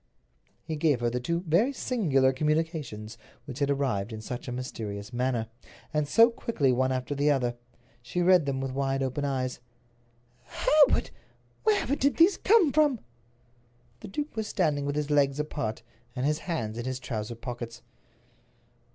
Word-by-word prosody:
He 160 - -4
gave 150 -5 +2
her 120 0 +1
the 125 - -1
two 170 +7 -1
very 180 - +2
singular 150 - +1
communications 150 -7 -2 0.3
which 135 -3 -7
had 140 -1 +1
arrived 130 -7 0
in 110 - -6
such 120 +4 -6
a - - -4
mysterious 110 -4 -6
manner, 120 -2 0 0.5
and 150 -1 +1
so 230 +9 +6
quickly 160 - 0
one 130 +1 +1
after 130 +2 -2
the 145 +1 +1
other. 125 -4 +1 0.5
She 120 +9 -4
read 180 -4 +5
them 135 -1 -1
with 135 -1 -3
wide 135 0 -1
open 135 +2 -2
eyes. 130 -2 -2 0.9
"Hereward! 300 -1 +3 0.5
Wherever 410 - +2
did 280 0 +1
these 345 +3 +5
come 390 -8 +4
from?" 295 -5 +3 1.0
The - - -9
duke 290 +10 -4
was 220 -1 -2
standing 150 -9 0
with 145 - -2
his 150 0 -2
legs 140 -1 +3
apart, 115 -7 -3 0.3
and 125 +1 -1
his 150 +1 +1
hands 115 -8 -2
in 120 - -4
his 130 0 -3
trousers 115 -3 -5
pockets. 120 -2 -7
140 Hz, 160 wpm, -28 LUFS, 125-165 Hz, 1.0 s, so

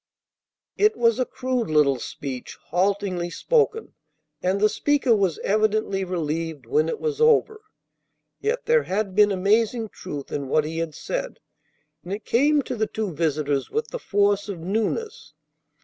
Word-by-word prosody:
It 425 +1 +3
was 230 0 +3
a 255 - +1
crude 255 -4 -2
little 145 -4 +3
speech, 130 -1 -6
haltingly 185 -1 0
spoken, 450 - 0 0.5
and 185 +2 +1
the 215 - +5
speaker 275 0 +2
was 190 -6 +1
evidently 215 -1 +1
relieved 165 -3 -3
when 450 +2 +1
it 470 - -3
was 455 -1 -2
over. 445 -1 +3 0.8
Yet 485 +3 -1
there 475 0 +4
had 195 0 -1
been 210 +1 +5
amazing 220 +4 +1
truth 145 -9 -8
in 140 -2 -3
what 150 +3 +2
he 160 +1 -4
had 165 -2 -3
said, - - -4 0.7
and 175 - -8
it 205 +2 -4
came 290 +4 +3
to 255 - -4
the 220 -1 0
two 215 -5 -3
visitors 150 -3 0
with 450 +1 -2
the - - -5
force 205 - +1
of 195 - -4
newness. 220 - -3
205 Hz, 155 wpm, -24 LUFS, 170-265 Hz, 0.8 s, the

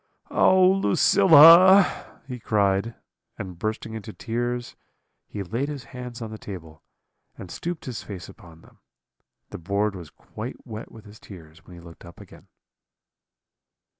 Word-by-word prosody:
"'Oh, 185 -1 +4
Lucilla!' 190 -1 +5
he 125 -2 -7
cried; 105 0 0 0.4
and 90 -3 -8
bursting 110 +1 -4
into 110 -1 -8
tears, 120 +2 -4 0.5
he 100 - -6
laid 115 +10 -4
his 140 -4 -7
hands 125 -1 -9
on 110 - -8
the 110 - -9
table, 80 -6 -10 0.6
and 90 -3 -10
stooped 175 -1 -6
his 125 -4 -6
face 95 -5 -9
upon 85 -7 -16
them: - - -22 0.7
the - - -8
board 100 +4 -2
was 85 -4 -10
quite - - -10
wet 110 +1 -9
with 110 -1 -15
his 105 +1 -15
tears 80 -4 -15
when 90 - -13
he - - -13
looked 85 -1 -15
up 85 -2 -14
again. - - -16
110 Hz, 145 wpm, -24 LUFS, 95-125 Hz, 0.7 s, Lucilla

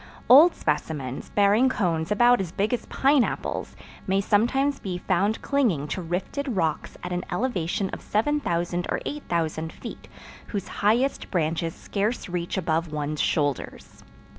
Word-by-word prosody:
Old 305 +7 +8
specimens, 135 -5 -3
bearing 205 +5 +4
cones 170 -8 -1
about 240 +2 +5
as 180 -4 -4
big 205 +5 0
as 245 - -2
pineapples, 275 -2 +1 0.3
may 195 +1 +2
sometimes 255 +8 +2
be 185 -3 -4
found 195 +4 0
clinging 225 - +1
to 185 - -3
rifted 195 - -3
rocks 160 -4 -1
at 180 - -5
an 180 - -2
elevation 195 -2 -1
of - - -6
7000 180 - 0
or - - 0
8000 165 - -2
feet, - - -9 0.4
whose 200 -3 -4
highest 235 +7 +2
branches 165 -1 -1
scarce 210 +4 -2
reach 175 0 -3
above 165 -2 0
one's 150 0 -2
shoulders. 145 -4 -2
190 Hz, 140 wpm, -25 LUFS, 165-240 Hz, 0.4 s, Old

